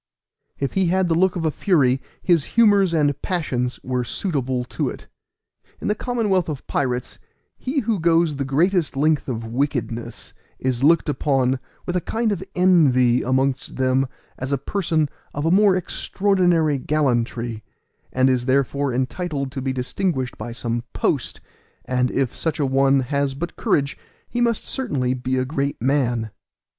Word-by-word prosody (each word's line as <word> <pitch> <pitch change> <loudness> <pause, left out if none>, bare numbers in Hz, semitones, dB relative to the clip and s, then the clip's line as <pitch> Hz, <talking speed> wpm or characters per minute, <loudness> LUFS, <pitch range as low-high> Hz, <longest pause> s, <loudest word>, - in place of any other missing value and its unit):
If 140 - -2
he 190 -2 +2
had 185 +1 +2
the - - +3
look 185 +2 +2
of 170 -2 -2
a 155 - +2
fury, 135 -9 +2 0.2
his 170 -5 +3
humors 205 -5 +5
and 145 -4 +1
passions 130 -9 -2
were 125 -1 -1
suitable 130 -4 -2
to 125 - -2
it. - - -9 0.7
In - - -3
the - - +3
commonwealth 210 -8 0
of 145 -4 -5
pirates, 125 -2 -2 0.4
he 275 +2 -2
who 220 -3 0
goes 165 -2 +2
the 140 - -1
greatest 160 +2 +1
length 155 +1 +2
of 115 -3 -3
wickedness 120 -1 -3 0.2
is 130 -1 -1
looked 165 +3 +4
upon 135 -3 +1 0.3
with 180 - -3
a 180 - +1
kind 225 +3 -1
of 190 -2 -2
envy 135 -10 +4
amongst 130 +1 0
them 130 +1 +2 0.3
as 130 +2 -4
a 140 - +2
person 160 0 0 0.3
of 145 +2 -2
a 165 - +3
more 200 0 +5
extraordinary 175 -5 +1
gallantry, 120 -6 -1 0.5
and 130 0 +3
is 125 -1 +1
thereby 140 0 +1
entitled 140 +1 -2
to 135 0 -5
be 135 0 -1
distinguished 130 +1 -2
by 120 - -6
some 120 0 -3
post, - - -1 0.4
and 125 0 +1
if 135 -3 -1
such 160 -1 -2
a 145 - +2
one 135 0 +3
has 140 +1 -1
but 170 +5 -5
courage, 140 +1 0 0.3
he 240 - -2
must 235 -2 +1
certainly 140 - -1
be 130 +1 -2
a 130 - +1
great 140 0 -2
man. 120 -4 0
140 Hz, 160 wpm, -22 LUFS, 130-175 Hz, 0.7 s, humors